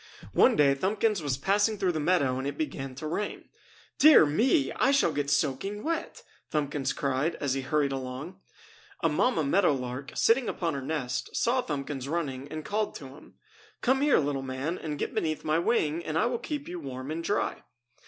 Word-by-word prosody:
One -, -, +5 dB
day 145 Hz, -2 st, +5 dB
Thumbkins 200 Hz, +6 st, 0 dB
was 140 Hz, -4 st, -1 dB
passing 205 Hz, +7 st, +2 dB
through 185 Hz, -2 st, +1 dB
the 160 Hz, -, -2 dB
meadow 145 Hz, -6 st, +2 dB
and 135 Hz, -, -3 dB
it 140 Hz, -, -4 dB
began 135 Hz, -, -4 dB
to 145 Hz, -, -7 dB
rain. 185 Hz, +7 st, -4 dB, 0.5 s
"Dear 305 Hz, -, +8 dB
me! 255 Hz, -, +2 dB
I 260 Hz, -, +2 dB
shall 280 Hz, -, +3 dB
get 145 Hz, -2 st, -2 dB
soaking 150 Hz, +8 st, 0 dB
wet!" 330 Hz, 0 st, -3 dB, 0.3 s
Thumbkins 145 Hz, -2 st, -1 dB
cried 140 Hz, +4 st, -1 dB
as 140 Hz, -3 st, -1 dB
he 135 Hz, -, -1 dB
hurried 145 Hz, +1 st, 0 dB
along. 135 Hz, +7 st, -6 dB, 0.6 s
A -, -, +4 dB
mamma 245 Hz, -11 st, +2 dB
meadow 175 Hz, +3 st, +3 dB
lark, 130 Hz, +1 st, -5 dB
sitting 235 Hz, +2 st, +3 dB
upon 170 Hz, -3 st, -2 dB
her 140 Hz, -, -3 dB
nest, 135 Hz, -3 st, -3 dB
saw 250 Hz, +2 st, +2 dB
Thumbkins 140 Hz, -, -4 dB
running 140 Hz, -4 st, -3 dB
and 155 Hz, +1 st, -7 dB
called 210 Hz, +1 st, -1 dB
to 135 Hz, -, -8 dB
him: 135 Hz, -, -15 dB, 0.5 s
"Come 265 Hz, +2 st, +2 dB
here, 290 Hz, 0 st, +4 dB
little 140 Hz, -2 st, 0 dB
man, 135 Hz, +6 st, -3 dB
and 150 Hz, -2 st, -4 dB
get -, -, -3 dB
beneath 155 Hz, -1 st, -1 dB
my 155 Hz, +1 st, +2 dB
wing 170 Hz, -5 st, +1 dB
and 155 Hz, 0 st, -2 dB
I 190 Hz, -, +3 dB
will 240 Hz, -1 st, -1 dB
keep 290 Hz, +3 st, -5 dB
you 175 Hz, 0 st, -5 dB
warm 135 Hz, -1 st, -6 dB
and 165 Hz, +1 st, -3 dB
dry!" 205 Hz, -, -1 dB
155 Hz, 195 wpm, -28 LUFS, 140-205 Hz, 0.6 s, Dear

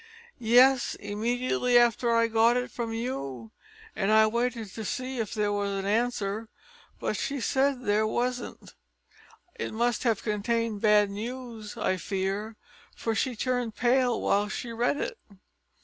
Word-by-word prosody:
"Yes, 245 Hz, +3 st, +5 dB
immediately 240 Hz, +4 st, 0 dB
after 240 Hz, 0 st, +3 dB
I 230 Hz, 0 st, +4 dB
got 230 Hz, +1 st, +3 dB
it 250 Hz, -, -3 dB
from 235 Hz, -2 st, -4 dB
you; 135 Hz, -, -4 dB, 0.4 s
and 195 Hz, +1 st, 0 dB
I 220 Hz, 0 st, +6 dB
waited 235 Hz, -1 st, -1 dB
to 220 Hz, -, -6 dB
see 260 Hz, +1 st, -3 dB
if 225 Hz, +1 st, -3 dB
there 210 Hz, -1 st, +1 dB
was 205 Hz, 0 st, -1 dB
an 195 Hz, -1 st, -3 dB
answer, 215 Hz, -1 st, -1 dB, 0.5 s
but -, -, -2 dB
she 280 Hz, 0 st, -2 dB
said 265 Hz, +1 st, +1 dB
there 215 Hz, 0 st, +2 dB
wasn't. 245 Hz, +2 st, -3 dB, 0.8 s
It -, -, -5 dB
must 240 Hz, 0 st, +1 dB
have 230 Hz, -5 st, 0 dB
contained 220 Hz, 0 st, -1 dB
bad 210 Hz, -2 st, +4 dB
news, 230 Hz, 0 st, -6 dB
I 190 Hz, -4 st, 0 dB
fear, 195 Hz, +4 st, -3 dB, 0.4 s
for 225 Hz, -, -2 dB
she 250 Hz, +2 st, -1 dB
turned 245 Hz, -1 st, -1 dB
pale 245 Hz, 0 st, +2 dB
while 205 Hz, +1 st, +1 dB
she 235 Hz, +2 st, -5 dB
read 240 Hz, +5 st, +1 dB
it." 465 Hz, +9 st, -4 dB
230 Hz, 150 wpm, -28 LUFS, 210-245 Hz, 0.8 s, I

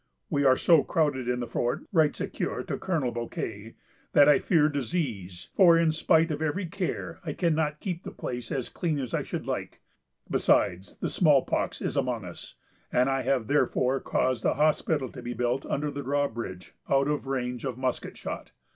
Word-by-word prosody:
"We 145 Hz, -2 st, +2 dB
are 130 Hz, -1 st, +6 dB
so 165 Hz, -4 st, +5 dB
crowded 145 Hz, -6 st, 0 dB
in 125 Hz, 0 st, 0 dB
the -, -, -2 dB
fort," 120 Hz, +1 st, -2 dB
writes 160 Hz, -5 st, +3 dB
Ecuyer -, -, -3 dB
to -, -, -4 dB
Colonel 160 Hz, -10 st, -1 dB
Bouquet, 115 Hz, -2 st, -5 dB, 0.4 s
"that 145 Hz, -1 st, +7 dB
I 150 Hz, -, +6 dB
fear 160 Hz, -5 st, +3 dB
disease; 125 Hz, -, -3 dB
for, 170 Hz, -3 st, +7 dB
in 165 Hz, -1 st, +3 dB
spite 160 Hz, +1 st, +3 dB
of 150 Hz, 0 st, -3 dB
every 160 Hz, +5 st, -1 dB
care, 175 Hz, +2 st, -4 dB
I 155 Hz, -4 st, -3 dB
cannot 155 Hz, -3 st, 0 dB
keep 180 Hz, -3 st, -4 dB
the -, -, -7 dB
place 120 Hz, -2 st, -6 dB
as 130 Hz, -4 st, -2 dB
clean 165 Hz, -4 st, -2 dB
as 130 Hz, -5 st, -4 dB
I -, -, +1 dB
should -, -, -5 dB
like. -, -, -4 dB, 0.5 s
Besides, 95 Hz, +2 st, +1 dB
the -, -, -2 dB
small 150 Hz, -7 st, +4 dB
pox -, -, -2 dB
is -, -, -2 dB
among 120 Hz, -6 st, -1 dB
us; 90 Hz, -, -10 dB, 0.4 s
and 125 Hz, +2 st, +3 dB
I 135 Hz, 0 st, +1 dB
have 130 Hz, -3 st, +1 dB
therefore 135 Hz, 0 st, +1 dB
caused 130 Hz, -3 st, 0 dB
a -, -, +2 dB
hospital 150 Hz, -1 st, +1 dB
to -, -, -9 dB
be 120 Hz, 0 st, -5 dB
built 125 Hz, +3 st, -1 dB
under 145 Hz, +1 st, -1 dB
the 140 Hz, -, -5 dB
drawbridge, 120 Hz, -9 st, -3 dB, 0.2 s
out 135 Hz, 0 st, +3 dB
of 150 Hz, -2 st, -1 dB
range 125 Hz, -2 st, -2 dB
of 130 Hz, -3 st, -3 dB
musket 130 Hz, -1 st, -3 dB
shot.... -, -, -6 dB
135 Hz, 190 wpm, -28 LUFS, 125-155 Hz, 0.5 s, that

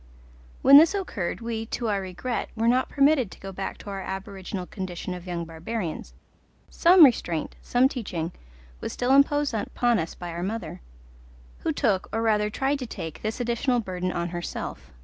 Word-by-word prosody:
When 275 Hz, +1 st, +10 dB
this 330 Hz, +5 st, +4 dB
occurred 235 Hz, -, -3 dB
we, 225 Hz, -1 st, -3 dB
to 235 Hz, -, -3 dB
our 200 Hz, -2 st, 0 dB
regret, 190 Hz, +6 st, -4 dB
were 225 Hz, +1 st, 0 dB
not 250 Hz, +2 st, +3 dB
permitted 280 Hz, -5 st, +3 dB
to -, -, -13 dB
go 195 Hz, -, -7 dB
back 195 Hz, +1 st, -5 dB
to 200 Hz, -, -8 dB
our 195 Hz, -1 st, -4 dB
aboriginal 190 Hz, -1 st, -5 dB
condition 185 Hz, -1 st, -5 dB
of 180 Hz, 0 st, -8 dB
young 170 Hz, -1 st, -3 dB
barbarians: 165 Hz, +2 st, -5 dB, 0.6 s
some 350 Hz, -1 st, +8 dB
restraint, 175 Hz, -, 0 dB
some 250 Hz, +2 st, +3 dB
teaching 180 Hz, -, -4 dB, 0.5 s
was -, -, -4 dB
still 245 Hz, +1 st, 0 dB
imposed 285 Hz, 0 st, +4 dB
upon 235 Hz, +1 st, +1 dB
us 165 Hz, -1 st, -4 dB
by 175 Hz, -1 st, -6 dB
our 170 Hz, +1 st, -5 dB
mother, 215 Hz, -, -4 dB, 0.8 s
who -, -, -1 dB
took, 190 Hz, -1 st, 0 dB
or 225 Hz, +1 st, -1 dB
rather 210 Hz, -2 st, +2 dB
tried 275 Hz, +6 st, 0 dB
to 250 Hz, -, -5 dB
take, 160 Hz, -7 st, -7 dB
this 220 Hz, +3 st, -3 dB
additional 245 Hz, +1 st, +1 dB
burden 185 Hz, -4 st, -3 dB
on 170 Hz, 0 st, -2 dB
herself. 170 Hz, -, -6 dB
210 Hz, 175 wpm, -26 LUFS, 180-245 Hz, 0.8 s, When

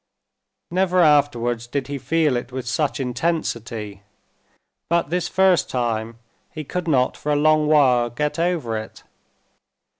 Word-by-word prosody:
Never 185 Hz, 0 st, +1 dB
afterwards 120 Hz, -6 st, +2 dB
did 135 Hz, +2 st, -3 dB
he 140 Hz, +1 st, -5 dB
feel 160 Hz, -2 st, +1 dB
it 120 Hz, +1 st, -4 dB
with 130 Hz, -1 st, -6 dB
such 145 Hz, +3 st, -1 dB
intensity, 115 Hz, -, -3 dB, 0.9 s
but 170 Hz, -3 st, 0 dB
this 180 Hz, 0 st, 0 dB
first 190 Hz, -2 st, +2 dB
time 115 Hz, -2 st, -2 dB, 0.3 s
he 155 Hz, -, -7 dB
could 180 Hz, +4 st, -4 dB
not 130 Hz, -5 st, +2 dB
for 150 Hz, -, -3 dB
a -, -, +2 dB
long 155 Hz, +1 st, +3 dB
while 130 Hz, -6 st, +4 dB
get 150 Hz, +7 st, -3 dB
over 165 Hz, -10 st, -1 dB
it. 110 Hz, -, -11 dB
145 Hz, 140 wpm, -22 LUFS, 120-160 Hz, 0.9 s, while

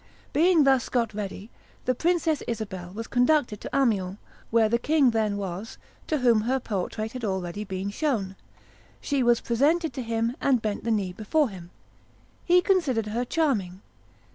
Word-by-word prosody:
Being 330 Hz, 0 st, +5 dB
thus 265 Hz, -3 st, +3 dB
got 235 Hz, -3 st, 0 dB
ready, 205 Hz, +1 st, -6 dB, 0.3 s
the 255 Hz, -, +2 dB
Princess 325 Hz, +1 st, +1 dB
Isabel 200 Hz, -6 st, -5 dB
was 225 Hz, +4 st, -6 dB
conducted 245 Hz, -3 st, +2 dB
to -, -, -6 dB
Amiens, 200 Hz, -8 st, +1 dB, 0.3 s
where 225 Hz, -1 st, +4 dB
the 235 Hz, +2 st, +1 dB
king 290 Hz, -2 st, +3 dB
then 215 Hz, -2 st, 0 dB
was, 195 Hz, +2 st, -5 dB, 0.3 s
to 310 Hz, -, +1 dB
whom 240 Hz, -5 st, +4 dB
her 255 Hz, +4 st, 0 dB
portrait 215 Hz, 0 st, -3 dB
had 255 Hz, -1 st, -7 dB
already 190 Hz, -1 st, -3 dB
been 190 Hz, 0 st, -4 dB
shown. 210 Hz, -7 st, -1 dB, 0.6 s
She 280 Hz, -2 st, -1 dB
was 240 Hz, -1 st, +3 dB
presented 305 Hz, +8 st, +1 dB
to 265 Hz, -, -4 dB
him, 230 Hz, +1 st, -1 dB
and 265 Hz, -3 st, +3 dB
bent 215 Hz, 0 st, -3 dB
the -, -, 0 dB
knee 200 Hz, -5 st, 0 dB
before 265 Hz, -, +1 dB
him. 180 Hz, -4 st, -10 dB, 0.7 s
He 360 Hz, 0 st, +5 dB
considered 310 Hz, -, +1 dB
her 235 Hz, +3 st, -1 dB
charming. 215 Hz, -, -1 dB
230 Hz, 165 wpm, -26 LUFS, 205-275 Hz, 0.7 s, Being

